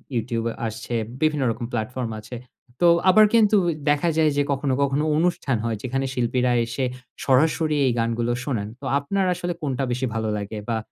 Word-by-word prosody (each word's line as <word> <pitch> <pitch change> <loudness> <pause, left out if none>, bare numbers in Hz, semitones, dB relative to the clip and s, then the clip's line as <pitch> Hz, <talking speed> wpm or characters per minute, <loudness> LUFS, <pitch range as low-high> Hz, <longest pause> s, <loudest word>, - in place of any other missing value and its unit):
YouTube 115 0 -2 0.2
আসছে, 110 +2 -6 0.3
বিভিন্ন 150 -3 +2
রকম 115 +1 -5
প্ল্যাটফর্ম 120 +1 -3
আছে। 110 +3 -9 0.5
তো 175 - +6 0.2
আবার 215 +3 +7
কিন্তু 215 -2 +5
ও - - 0 0.2
দেখা 145 +3 +2
যায় 155 -1 +4
যে 145 - +3
কখনো, 135 -1 0
কখনো 140 +2 0
অনুষ্ঠান 165 -7 +1
হয়, 115 -2 -1
যেখানে 135 +2 -1
শিল্পীরা 125 0 +1
এসে 125 +3 -2 0.4
সরাসরি 150 +3 +2
এই 125 - +3
গানগুলো 115 +1 0
শোনান। 110 -7 -2
তো 140 - -9
আপনার 190 +7 -1
আসলে 175 0 -3
কোনটা 135 -2 -2
বেশি 125 +2 -1
ভালো 110 -1 -1
লাগে 105 +1 -5
বা, 115 - +1
130 Hz, 175 wpm, -23 LUFS, 115-155 Hz, 0.5 s, আবার